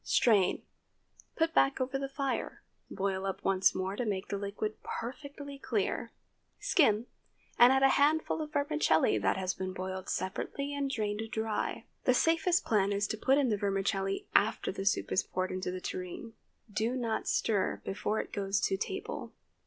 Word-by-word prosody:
Strain; 210 Hz, -6 st, +3 dB, 0.7 s
put 325 Hz, 0 st, +1 dB
back 275 Hz, 0 st, +3 dB
over 265 Hz, +1 st, -1 dB
the 275 Hz, 0 st, -3 dB
fire; 275 Hz, -1 st, -3 dB, 0.3 s
boil 195 Hz, -1 st, -2 dB
up 195 Hz, -, -4 dB
once 190 Hz, -1 st, +3 dB
more 190 Hz, +1 st, -2 dB
to 245 Hz, -, -2 dB
make 200 Hz, -3 st, -2 dB
the 200 Hz, -, -1 dB
liquid 205 Hz, +2 st, -4 dB
perfectly 280 Hz, +3 st, -6 dB
clear, -, -, -1 dB, 0.5 s
skim, 230 Hz, -, +3 dB, 0.5 s
and 245 Hz, +1 st, +9 dB
add 265 Hz, 0 st, +3 dB
a 270 Hz, -, +7 dB
handful 305 Hz, +3 st, +2 dB
of 305 Hz, -1 st, -5 dB
vermicelli 285 Hz, -, +2 dB
that 95 Hz, -, +1 dB
has 185 Hz, -1 st, -1 dB
been 185 Hz, 0 st, -4 dB
boiled 185 Hz, 0 st, -5 dB
separately 280 Hz, +9 st, -3 dB
and 280 Hz, -1 st, -1 dB
drained 210 Hz, -4 st, -2 dB
dry. 220 Hz, -2 st, -2 dB, 0.2 s
The 255 Hz, -, +4 dB
safest 340 Hz, +5 st, +3 dB
plan 205 Hz, -3 st, +2 dB
is 200 Hz, 0 st, +1 dB
to -, -, -1 dB
put 265 Hz, +5 st, +3 dB
in 275 Hz, -4 st, +3 dB
the 210 Hz, -, +1 dB
vermicelli 195 Hz, 0 st, -1 dB
after 220 Hz, +2 st, +2 dB
the 195 Hz, +1 st, -4 dB
soup -, -, +1 dB
is 190 Hz, -, +3 dB
poured 185 Hz, 0 st, -3 dB
into 185 Hz, -1 st, -3 dB
the 185 Hz, 0 st, -4 dB
tureen. 185 Hz, +6 st, -6 dB, 0.4 s
Do 225 Hz, +4 st, 0 dB
not 235 Hz, -3 st, -2 dB
stir 205 Hz, -4 st, 0 dB
before 210 Hz, +2 st, -1 dB
it -, -, -5 dB
goes 195 Hz, 0 st, 0 dB
to 195 Hz, -, +1 dB
table. 395 Hz, -, -5 dB
215 Hz, 170 wpm, -31 LUFS, 195-275 Hz, 0.7 s, and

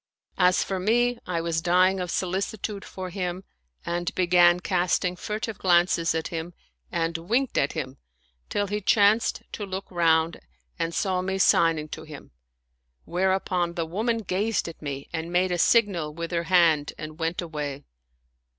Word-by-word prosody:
As 180 Hz, 0 st, +4 dB
for 190 Hz, -1 st, -3 dB
me, 240 Hz, +5 st, +2 dB
I 170 Hz, -2 st, -1 dB
was 165 Hz, -1 st, -1 dB
dying 185 Hz, +2 st, +3 dB
of 180 Hz, -1 st, -3 dB
solicitude 195 Hz, +3 st, -2 dB
for 185 Hz, -1 st, -7 dB
him 180 Hz, 0 st, -3 dB, 0.4 s
and 175 Hz, 0 st, -2 dB
began 175 Hz, -1 st, +5 dB
casting 180 Hz, 0 st, 0 dB
furtive 215 Hz, +2 st, -4 dB
glances 175 Hz, -2 st, +3 dB
at 160 Hz, -1 st, -2 dB
him 165 Hz, +1 st, -5 dB, 0.4 s
and 165 Hz, -1 st, -1 dB
winked 235 Hz, +10 st, 0 dB
at -, -, +1 dB
him, 135 Hz, -4 st, -5 dB, 0.5 s
till 205 Hz, -, 0 dB
he 205 Hz, +1 st, -3 dB
chanced 210 Hz, +3 st, +3 dB
to 210 Hz, -, -5 dB
look 190 Hz, 0 st, -5 dB
round 165 Hz, -1 st, +2 dB, 0.4 s
and 165 Hz, 0 st, -2 dB
saw 185 Hz, -2 st, 0 dB
me 190 Hz, +1 st, -2 dB
signing 165 Hz, -4 st, +3 dB
to 155 Hz, -, -7 dB
him; 155 Hz, -2 st, -11 dB, 0.7 s
whereupon 180 Hz, -1 st, 0 dB
the 165 Hz, -, -1 dB
woman 225 Hz, +7 st, -1 dB
gazed 200 Hz, +2 st, -1 dB
at 165 Hz, -, -9 dB
me 140 Hz, -2 st, -5 dB
and 165 Hz, +1 st, -4 dB
made 180 Hz, +1 st, +2 dB
a 175 Hz, -, -1 dB
signal 190 Hz, -8 st, +3 dB
with 170 Hz, +1 st, -5 dB
her 170 Hz, -1 st, -1 dB
hand 165 Hz, -4 st, +3 dB
and 155 Hz, +1 st, -8 dB
went 165 Hz, +1 st, -1 dB
away. 150 Hz, -4 st, -4 dB
175 Hz, 160 wpm, -26 LUFS, 165-190 Hz, 0.7 s, began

